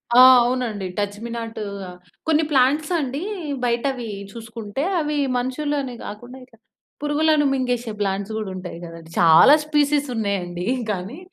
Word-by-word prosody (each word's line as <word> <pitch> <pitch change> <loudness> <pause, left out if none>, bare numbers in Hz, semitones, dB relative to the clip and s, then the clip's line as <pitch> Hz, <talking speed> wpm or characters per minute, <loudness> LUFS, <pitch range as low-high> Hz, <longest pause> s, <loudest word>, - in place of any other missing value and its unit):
ఆ! - - +8 0.2
అవునండి. 240 -5 -1
Touch 205 0 -1
me 235 - -5
నాటు, 225 -1 -5 0.7
కొన్ని 315 0 +3
ప్లాంట్స్ 285 +5 +3
అండి 275 +2 -3 0.4
బయట 235 0 0
అవి 245 -2 -6 0.3
చూసుకుంటే, 225 +2 -6 0.2
అవి 300 -1 -1 0.2
మనుషులనే 265 +1 -2
గాకుండా 245 +5 -9
ఇట్లా 230 -3 -21 0.4
పురుగులను 295 0 +2
మింగేసే 245 -3 -1
ప్లాంట్స్ 195 +1 -1
కూడా 215 -3 -4
ఉంటాయి 180 -2 -7
గదండీ! 165 -1 -10
చాలా 165 - +8
స్పెసీస్ 295 -1 +2
ఉన్నాయండి. 185 -4 -2 0.3
కానీ 195 +7 -5
240 Hz, 135 wpm, -22 LUFS, 205-285 Hz, 0.7 s, ఆ